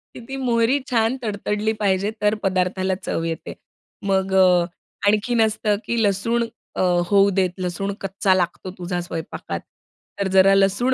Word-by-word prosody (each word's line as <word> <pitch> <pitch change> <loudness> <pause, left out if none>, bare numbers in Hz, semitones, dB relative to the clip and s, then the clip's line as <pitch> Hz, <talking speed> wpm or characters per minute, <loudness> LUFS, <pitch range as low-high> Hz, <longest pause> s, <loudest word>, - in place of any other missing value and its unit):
की - - -8
ती 270 - -5
मोहरी 245 +1 +2
छान 235 +1 +1
तडतडली 210 +1 -1
पाहिजे, 200 0 +1
तर 210 +1 +3
पदार्थाला 185 0 0
चव 165 - -2
येते. 165 -1 -4 0.5
मग 190 0 +1
अ, 180 -2 +5 0.4
आणखीन 225 +3 +2
असतं 215 -1 +1
की 235 -1 0
लसूण 220 +4 +1 0.3
अ, - - -1 0.3
होऊ 200 0 +5
देत, 185 -2 +2
लसूण 185 +2 -2
कच्चा 195 0 +1
लागतो 180 +1 -2
तुझा 180 0 -3
स्वयंपाकात. 165 -2 -5 0.6
तर 200 - +1
जरा 190 +1 +6
लसूण 200 +7 +2
195 Hz, 150 wpm, -22 LUFS, 185-220 Hz, 0.6 s, जरा